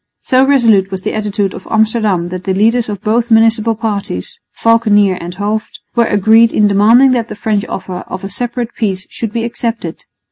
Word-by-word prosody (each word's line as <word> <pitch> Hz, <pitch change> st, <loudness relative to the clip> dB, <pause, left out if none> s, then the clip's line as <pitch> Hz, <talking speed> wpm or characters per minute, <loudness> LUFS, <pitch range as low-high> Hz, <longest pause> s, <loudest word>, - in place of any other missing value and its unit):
So 260 Hz, 0 st, +3 dB
resolute 230 Hz, -8 st, +3 dB
was 190 Hz, -1 st, -6 dB
the -, -, -2 dB
attitude 205 Hz, -2 st, -2 dB
of 185 Hz, -, -10 dB
Amsterdam 215 Hz, -5 st, +1 dB
that 185 Hz, 0 st, -7 dB
the 190 Hz, -, -1 dB
leaders 225 Hz, +3 st, +2 dB
of 205 Hz, -2 st, -5 dB
both 230 Hz, +2 st, 0 dB
municipal 225 Hz, 0 st, +3 dB
parties, 205 Hz, -, -4 dB, 0.2 s
Valckenier 210 Hz, -4 st, +3 dB
and 175 Hz, +1 st, -7 dB
Hooft, 210 Hz, +2 st, -3 dB
were 235 Hz, -1 st, +2 dB
agreed 220 Hz, +3 st, +4 dB
in 210 Hz, -, +3 dB
demanding 225 Hz, +7 st, +4 dB
that 235 Hz, -3 st, 0 dB
the -, -, -8 dB
French 210 Hz, -1 st, -1 dB
offers 180 Hz, -1 st, -6 dB
of 185 Hz, +1 st, -7 dB
a -, -, -4 dB
separate 240 Hz, +3 st, -4 dB
peace 190 Hz, -4 st, -2 dB
should 225 Hz, -3 st, -4 dB
be 230 Hz, +1 st, -2 dB
accepted. 230 Hz, -7 st, -4 dB
215 Hz, 185 wpm, -14 LUFS, 195-230 Hz, 0.2 s, agreed